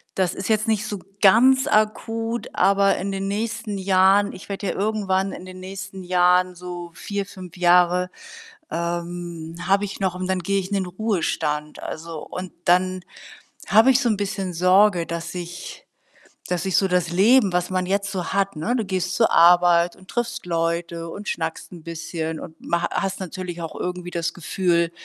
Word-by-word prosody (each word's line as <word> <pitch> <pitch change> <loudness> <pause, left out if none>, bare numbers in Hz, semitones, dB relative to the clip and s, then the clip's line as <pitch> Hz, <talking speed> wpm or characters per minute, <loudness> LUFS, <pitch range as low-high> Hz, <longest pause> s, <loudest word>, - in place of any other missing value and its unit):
Das 185 -2 +1
ist 195 +3 -5
jetzt 215 +1 +2
nicht 215 -1 +1
so 205 -2 -4 0.2
ganz 260 +7 +6
akut, 225 0 0
aber 195 +1 +3
in 195 +2 -3
den 195 0 -3
nächsten 215 +1 -3
Jahren 195 +1 +3
ich 185 - -11
werde 200 0 -4
ja - - 0
irgendwann 195 -2 0
in 180 - -9
den 185 0 -10
nächsten 190 0 -8
Jahren 180 0 +3
so 175 -1 -7
4, 200 +3 -4
5 185 -3 -11
Jahre, 180 +1 +4 0.6
ähm, 170 -1 -4
habe 200 +1 +3
ich 200 - -7
noch 190 -3 0
und 185 0 -4
dann 190 0 0
gehe 195 +3 0
ich 190 0 -5
in 205 - -1
den 190 -2 0
Ruhestand. 170 -6 -2
Also 160 0 -6
und 185 0 -7
dann 185 +1 +3 0.7
habe 225 +5 +6
ich 260 - +4
so 240 - +2
'n 215 - +1
bisschen 195 -2 -3
Sorge, 185 +1 +4
dass 170 +1 -5
ich 175 - -7 0.7
dass 180 +1 -1
ich 190 - +1
so 195 - +3
das 180 -2 +1
Leben, 200 +4 +4
was 180 0 0
man 185 -1 0
jetzt 200 +1 0
so 185 -3 -3
hat 195 -1 0
ne, 185 +11 -1
du 225 - -1
gehst 185 -1 -2
zur 225 - +3
Arbeit 175 0 +5
und 185 0 -19
triffst 240 -3 -3
Leute 170 0 -2
und 205 +4 -8
schnackst 160 -1 -4
'n 170 - -10
bisschen 160 -1 -4
und 160 0 -10
ma 170 0 0
hast 195 -1 -2
natürlich 180 -1 -6
auch 160 - -6
irgendwie 180 0 -4
das 170 -1 -2
Gefühl, 170 -1 0
185 Hz, 180 wpm, -23 LUFS, 175-200 Hz, 0.7 s, ganz